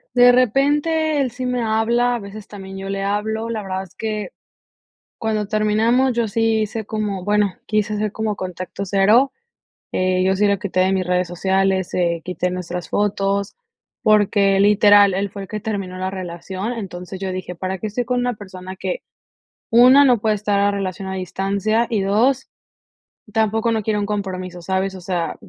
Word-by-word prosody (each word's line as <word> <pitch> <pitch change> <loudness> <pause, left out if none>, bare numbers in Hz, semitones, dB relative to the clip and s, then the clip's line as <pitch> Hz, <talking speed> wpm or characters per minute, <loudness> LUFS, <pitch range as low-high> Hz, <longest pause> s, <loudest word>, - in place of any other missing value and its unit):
De 245 0 +8
repente, 290 +5 +2
él 255 -3 -1
sí 255 +1 -5
me 250 -1 -1
habla, 235 +2 +1
a - - -3
veces, 200 0 -10
también, 195 -1 -9
yo 195 0 -6
le 195 0 -2
hablo. 220 +3 -1
La 225 -2 -2
verdad 190 -1 -4
es 185 - -16
que, 215 -3 -3 0.9
cuando 215 -2 -1
terminamos, 220 +5 +2
yo 235 -1 0
sí 225 +1 +1
hice 215 +1 -3
como, 205 -3 -3
bueno, 205 -1 +1
quise 215 0 0
hacer 210 0 -1
como 220 -1 -2
contacto 185 +1 -5
cero, 210 +8 +4 0.6
eh, 185 0 +1
yo 190 0 +2
sí 205 +2 +3
lo 200 -1 +2
quité 185 -2 -1
de 185 +1 +3
mis 185 -2 0
redes 180 -1 +1
sociales, 190 +1 0
eh, 170 -2 +1
quité 180 0 -2
nuestras 180 -1 -5
fotos, 200 -1 0 0.5
porque, 205 -2 +3
literal, 205 -1 +6
él 200 +1 -1
fue 200 0 -7
el 195 - -9
que 215 - -4
terminó 195 -4 -4
la 185 0 -2
relación. 185 +3 -5
Entonces, 185 -3 -7
yo 190 -1 -3
dije: 185 -1 -5
"¿Para 185 +2 -4
qué 215 - -4
estoy 215 +4 -2
con 250 0 0
una 245 -1 0
persona 190 -2 -9
que, - - -4 0.7
una, 255 +5 +7
no 250 -4 +4
puede 215 0 +1
estar 205 -1 0
la 200 0 +3
relación 195 -1 -4
a 190 - -4
distancia, 200 +5 0
y 220 -4 0
dos, 235 +7 +1 0.8
tampoco 220 +1 +1
no 220 -1 0
quiere 210 0 0
un 205 - -1
compromiso?", 185 -3 -4
¿sabes?, 190 +2 -1
o 185 - -9
sea 175 -2 -2
205 Hz, 185 wpm, -20 LUFS, 190-220 Hz, 0.9 s, De